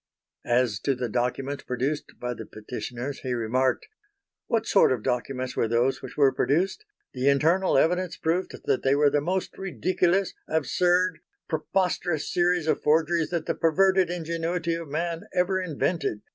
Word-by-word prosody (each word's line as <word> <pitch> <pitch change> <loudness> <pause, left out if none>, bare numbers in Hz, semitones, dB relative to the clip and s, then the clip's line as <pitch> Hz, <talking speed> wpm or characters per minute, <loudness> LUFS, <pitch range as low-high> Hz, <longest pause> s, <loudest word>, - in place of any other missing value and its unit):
As 120 -4 +2
to 135 - 0
the 125 -1 -2
documents 125 +4 -2
produced 135 +4 -3
by 125 0 -3
the - - -9
Petitioners 125 +4 -6
he 125 -2 -2
remarked: 125 +3 0 0.6
"What 225 -1 0
sort 195 - +4
of 120 -4 -1
documents 125 +1 -2
were - - +1
those 120 +4 +1
which 130 - -9
were 140 -2 +5
produced? 185 - 0 0.3
The 130 +2 +2
internal 160 +5 +3
evidence 180 +4 +1
proved 170 +4 -2
that - - +1
they 135 +1 +3
were 145 0 +4
the 145 - +2
most 185 +4 -2
ridiculous, 185 - 0
absurd, 175 +4 +1 0.3
preposterous 175 -1 -1
series 175 -2 +2
of 160 - +1
forgeries 160 +2 +2
that 170 -3 -2
the - - 0
perverted 185 +2 +3
ingenuity 170 0 -2
of 165 -2 -5
man 165 +2 -3
ever 185 +1 +2
invented 145 - -2
155 Hz, 155 wpm, -26 LUFS, 130-180 Hz, 0.6 s, were